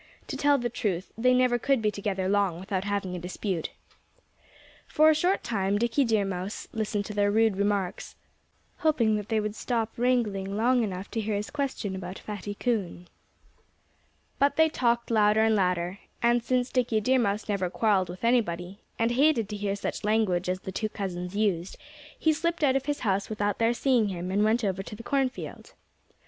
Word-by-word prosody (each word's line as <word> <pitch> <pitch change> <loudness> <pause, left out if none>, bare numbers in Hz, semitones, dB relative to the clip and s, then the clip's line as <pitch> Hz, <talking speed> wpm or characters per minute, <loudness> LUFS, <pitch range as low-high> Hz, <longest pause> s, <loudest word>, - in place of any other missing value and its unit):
To - - -3
tell 285 0 +3
the 240 -2 -1
truth, 200 -6 -3
they 250 +3 +3
never 250 -1 +3
could 275 +1 +2
be 215 -1 +1
together 195 -2 -2
long 195 -4 +1
without 190 0 -3
having 200 -3 -2
a - - -4
dispute. 180 0 -3 1.2
For 310 +1 +5
a - - +4
short 355 +5 +1
time 200 -3 0
Dickie 235 +5 +2
Deer 220 -3 +2
Mouse 190 +1 -4
listened 210 -2 -2
to 210 - -6
their 205 0 +2
rude 220 0 +3
remarks, 200 -1 -1 0.6
hoping 255 -10 +2
that 210 0 -6
they 220 -1 +2
would 210 0 -2
stop 225 0 -2
wrangling 210 -6 0
long 245 +3 +3
enough 190 -2 -5
to 225 - -1
hear 215 0 -2
his 205 +1 -4
question 265 -9 -3
about 185 0 -6
Fatty 205 -1 -6
Coon. 200 -7 -2 1.3
But 280 +1 +3
they 320 0 +4
talked 235 -5 0
louder 215 -1 +4
and 220 0 +3
louder. 180 -1 0 0.2
And 240 0 +3
since 250 0 0
Dickie 245 -3 +1
Deer 255 +5 +2
Mouse 205 -2 0
never 195 -4 -1
quarreled 195 -2 +1
with 180 +4 -9
anybody, 200 -6 0 0.2
and 230 +1 +1
hated 260 -3 +3
to 210 - -4
hear 205 -1 -2
such 200 - -4
language 205 -4 +1
as 185 0 -2
the 190 - -6
two 215 +3 -2
cousins 185 -3 -5
used, 195 -4 0 0.4
he 315 - +2
slipped 335 +2 -1
out 270 -2 +4
of 270 +1 -1
his 290 0 -1
house 200 -3 0
without 205 -1 -1
their 230 0 +3
seeing 245 -4 +2
him 180 -1 -4
and 205 +2 +2
went 225 +2 +2
over 195 -2 -1
to 200 - -8
the 230 - -10
cornfield. 265 0 -2
210 Hz, 190 wpm, -27 LUFS, 195-240 Hz, 1.3 s, For